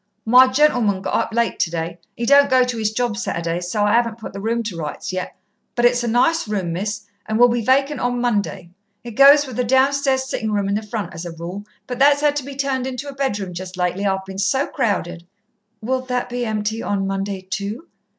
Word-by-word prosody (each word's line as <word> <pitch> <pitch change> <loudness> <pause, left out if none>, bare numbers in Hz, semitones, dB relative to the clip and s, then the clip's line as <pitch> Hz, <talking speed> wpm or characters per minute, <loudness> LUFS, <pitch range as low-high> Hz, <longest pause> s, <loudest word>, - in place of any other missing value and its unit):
"My 250 +3 +7
gentleman 250 -8 +2
got - - -3
up - - 0
late 235 0 0
today 170 +1 -2 0.2
he 235 - -2
don't 280 +2 +6
go 260 -1 +5
to 250 -2 -3
'is 215 -1 0
job 240 -1 -1
Saturdays, 170 -4 -3
so 210 +2 0
I 205 - +2
'aven't 230 -1 +1
put 220 - -9
the 200 - -6
room 230 +2 -1
to 210 -5 -5
rights 160 +2 -5
yet. 185 0 -4 0.4
But 240 - +2
it's 240 0 +3
a - - -1
nice 250 +6 +2
room, 190 -5 -2
Miss, 205 +3 -3 0.2
and 215 0 -1
will 245 +1 +6
be 240 0 0
vacant 275 +4 +2
on 245 0 -1
Monday. 205 -7 -1 0.3
It 240 - -7
goes 280 +5 +7
with 255 -4 -8
the 250 - +1
downstairs 265 +1 +2
sitting 220 -4 -3
room 205 -1 0
in 200 - 0
the 210 - 0
front, 210 -2 -5
as 165 0 -7
a 175 - -6
rule, 180 +5 -7 0.2
but 250 +1 -6
that's 285 +1 +4
'ad 295 -1 +3
to 290 - -2
be 275 +1 -8
turned 265 -2 -1
into 265 +2 -5
a - - -7
bedroom 205 -9 -2
just 185 +1 -7
lately. 180 +2 -1
I've 190 -1 -1
been 190 0 -7
so 265 +8 +1
crowded." 175 -5 -2 0.5
"Will 255 +4 -1
that 250 -1 -3
be 245 -1 -3
empty 215 +1 -2
on 195 -1 -1
Monday, 195 0 -3
too?" 200 - -5
225 Hz, 230 wpm, -20 LUFS, 195-255 Hz, 0.5 s, My